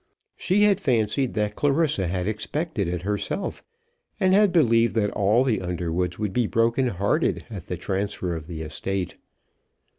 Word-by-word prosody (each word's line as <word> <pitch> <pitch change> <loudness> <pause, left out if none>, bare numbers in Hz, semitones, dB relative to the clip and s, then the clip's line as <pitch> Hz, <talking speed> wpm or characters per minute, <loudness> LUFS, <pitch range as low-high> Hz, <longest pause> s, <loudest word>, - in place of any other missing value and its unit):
She 200 +3 +2
had 205 -2 +4
fancied 120 - 0
that 105 -1 -1
Clarissa 145 - +1
had 90 +1 -2
expected 110 - -2
it 90 0 -3
herself, 105 - -3 0.6
and 190 -2 +3
had 205 -1 +5
believed 115 -9 +3
that 105 -2 +1
all 105 +5 +3
the 125 -7 0
Underwoods 90 0 -2
would 105 -3 -2
be 120 -3 +1
broken 115 +4 +2
hearted 100 -3 0
at - - -7
this - - -3
transfer 95 -2 -2
of 80 -2 -7
the 80 -2 -6
estate. 90 +4 -4
105 Hz, 155 wpm, -24 LUFS, 90-130 Hz, 0.6 s, had